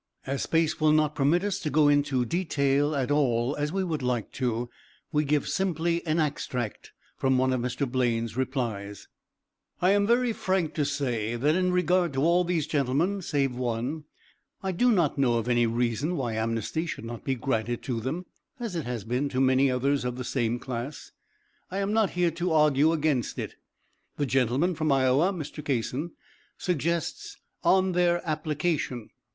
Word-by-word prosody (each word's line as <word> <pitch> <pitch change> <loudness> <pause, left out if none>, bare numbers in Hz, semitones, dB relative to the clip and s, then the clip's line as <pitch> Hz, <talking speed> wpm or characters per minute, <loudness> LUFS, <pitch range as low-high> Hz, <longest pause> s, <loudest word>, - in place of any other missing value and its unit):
As 135 0 -2
space 165 -1 +1
will 155 -1 +5
not 155 -1 +3
permit 150 +6 +2
us 205 -2 -1
to 155 - -2
go 150 0 +4
into 145 -3 +2
detail 145 -2 +1
at 135 0 -1
all 130 -2 +2
as 150 +1 -1
we 190 +1 0
would 160 -5 -2
like 125 -3 -1
to, 120 -2 -2 0.4
we 150 0 +2
give 145 -1 +1
simply 170 -2 0
an 155 +2 +1
extract 125 -7 -3 0.2
from 130 -1 +2
one 130 0 +2
of 125 - 0
Mr. 125 +3 -2
Blaine's 115 -3 0
replies: 115 -6 -3 0.7
"I 180 +2 +4
am 200 0 +3
very 240 0 +3
frank 185 -6 -1
to 150 - 0
say 120 -6 -1
that 145 +6 +2
in 180 +1 +1
regard 180 -2 +2
to 135 +1 0
all 170 +2 +4
these 170 -4 0
gentlemen, 150 +8 0
save 140 -6 0
one, 125 +5 -2 0.6
I 190 - 0
do 245 +8 +3
not 170 -9 +2
know 125 -4 +3
of 115 0 -1
any 120 -1 +3
reason 120 +8 0
why 120 -5 -2
amnesty 115 +9 -2
should 115 - -5
not 115 0 -7
be 135 - 0
granted 120 -2 -2
to 120 -3 -2
them 145 +10 -3 0.3
as 230 -6 -4
it 165 - -2
has 120 -4 -4
been 125 +6 -1
to 130 - -2
many 130 +1 +4
others 135 +2 +1
of 125 0 -2
the 125 - -5
same 120 -2 -1
class. 130 +3 -6 0.6
I 190 - -4
am 200 +1 0
not 220 -3 +3
here 175 -1 +3
to 170 +1 -1
argue 150 0 +4
against 150 -6 0
it. - - -4 0.6
The 145 - +1
gentleman 135 +6 +1
from 155 -2 0
Iowa 135 +6 +3
(Mr. 155 -4 -6
Kasson) 140 +4 -2 0.4
suggests 180 - -2 0.3
'on 190 0 +4
their 175 0 +1
application.' 155 -5 -2
145 Hz, 180 wpm, -27 LUFS, 125-170 Hz, 0.7 s, will